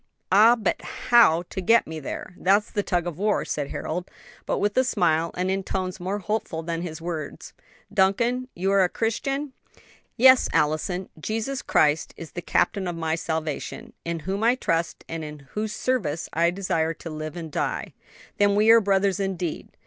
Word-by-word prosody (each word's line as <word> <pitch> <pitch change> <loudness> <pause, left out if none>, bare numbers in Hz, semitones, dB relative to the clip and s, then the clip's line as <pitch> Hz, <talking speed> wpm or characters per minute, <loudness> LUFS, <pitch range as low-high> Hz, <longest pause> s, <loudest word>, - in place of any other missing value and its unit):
"Ah, 220 +5 +7
but 220 -5 -1 0.3
how 220 -9 +6
to 190 - -3
get 230 +6 +4
me 160 0 -6
there? 155 +4 -6
that's 200 +4 +2
the 205 - 0
tug 175 -3 -1
of 175 -1 -5
war," 210 +1 +1
said 145 -2 -2
Harold, 175 +3 -4 0.4
but - - 0
with 205 0 0
a 260 - +4
smile 170 -9 +1
and 185 +1 0
in 195 0 0
tones 185 -1 -3
more 190 +3 -2
hopeful 205 -5 -3
than 165 0 -3
his 165 -3 -5
words. 160 -4 -5 0.4
"Duncan, 235 +6 +2
you 190 +3 0
are 195 -1 +5
a 180 - +2
Christian?" 270 +7 -2 0.6
"Yes, 260 +1 +7
Allison; 155 +5 0
Jesus 225 - -3
Christ 150 +1 +2
is 165 - -9
the 175 - -5
Captain 190 +2 0
of 175 - -3
my 160 -1 -1
salvation; 160 -3 -4
in 170 -1 -3
whom 195 +5 -3
I 235 +2 +4
trust, 165 -9 -2
and 165 -1 -5
in 150 -2 -9
whose 215 0 -3
service 185 - -1
I 170 +1 +3
desire 170 -3 -1
to 165 - -8
live 155 0 -6
and 165 -2 -6
die." - - -2 0.4
"Then 205 0 +4
are - - 0
we 220 +2 +6
brothers 195 -1 +1
indeed!" 185 -4 -3
185 Hz, 180 wpm, -25 LUFS, 165-210 Hz, 0.6 s, Ah